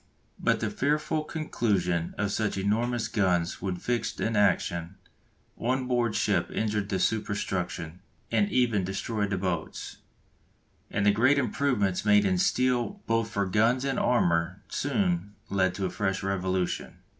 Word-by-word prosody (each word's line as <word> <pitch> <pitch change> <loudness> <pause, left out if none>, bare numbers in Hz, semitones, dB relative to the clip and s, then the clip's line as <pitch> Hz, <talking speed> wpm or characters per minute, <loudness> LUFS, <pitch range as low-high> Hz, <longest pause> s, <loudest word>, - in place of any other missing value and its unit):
But - - +1
the - - -1
fearful 150 +2 0
concussion 95 - -1
of 100 -1 0
such 110 -1 -1
enormous 115 +4 0
guns 90 -5 0
when 95 -1 -2
fixed 120 +6 -2
in 115 0 0
action 90 -3 +1 0.6
on 130 +2 0
board 120 -3 +1
ship 90 -4 +1
injured 105 -2 -1
the 95 - 0
superstruction, 95 -5 -2 0.3
and 105 -3 +2
even 115 -6 +2
destroyed 100 +2 -2
the 95 - -1
boats, 90 -4 -3 0.9
and 100 - 0
the 105 - +6
great 130 +7 +4
improvements 120 -10 +1
made 105 -1 +5
in 95 -2 +2
steel 125 - +1
both 115 -1 +1
for 100 -1 0
guns 115 +7 +2
and 135 -2 0
armour 85 -5 +1
soon 170 - -1 0.2
led 95 -2 +2
to 95 - -2
a - - -2
fresh 95 -1 -1
revolution. 95 -1 -1
105 Hz, 145 wpm, -28 LUFS, 95-120 Hz, 0.9 s, the